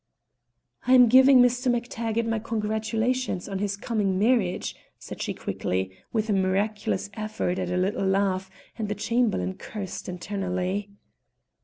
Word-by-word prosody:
"I'm 250 -1 +7
giving 260 +1 +8
Mr. 245 +1 +2
MacTaggart 230 -1 -1
my 225 -1 0
congratulations 220 0 -1
on 195 -1 -3
his 200 0 -2
coming 200 -4 0
marriage," 210 -3 +1 0.2
said - - -9
she - - -2
quickly, 95 +1 -2 0.2
with 220 -1 0
a 210 - +1
miraculous 200 +1 0
effort 215 -4 -2
at 180 -1 -2
a 180 - -1
little 195 +1 0
laugh, 190 -1 +1 0.3
and 215 -2 -2
the 210 - -1
Chamberlain 220 - 0
cursed 200 -4 -6
internally. 185 +1 -3
210 Hz, 135 wpm, -26 LUFS, 190-230 Hz, 0.3 s, giving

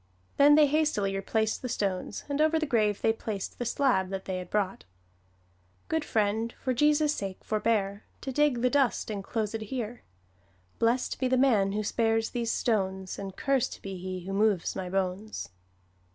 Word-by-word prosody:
Then 290 +1 +7
they 305 0 +7
hastily 285 -10 +1
replaced 220 +3 0
the 250 - -4
stones, 195 -5 -2
and 285 +1 0
over 315 +1 +4
the 315 - 0
grave 215 -7 +1
they 225 - +4
placed 215 -3 -5
the 245 - -2
slab 235 -7 +2
that 190 0 -5
they 185 -1 -3
had 180 -1 -8
brought: 200 -2 -1 1.1
"Good 320 -1 0
friend, 220 -1 0
for 255 - -1
Jesus' 295 +3 +3
sake 195 -6 -5
forbear, 210 -2 0 0.2
To 270 - -4
dig 270 -3 +2
the 250 - +3
dust 265 -6 +1
enclosed 215 +2 -3
here, 235 +1 -4 0.8
Blest 235 +2 +1
be 260 - +1
the 255 0 +2
man 215 -7 +3
who 215 +1 -1
spares 225 +1 +1
these 235 -2 -1
stones, 190 -4 -1
And 195 -1 -6
cursed 270 +1 0
be 195 -1 -5
he 185 0 -5
who 195 - -4
moves 205 -3 +1
my 185 -2 -4
bones." 195 +3 -2
220 Hz, 170 wpm, -28 LUFS, 195-255 Hz, 1.1 s, Then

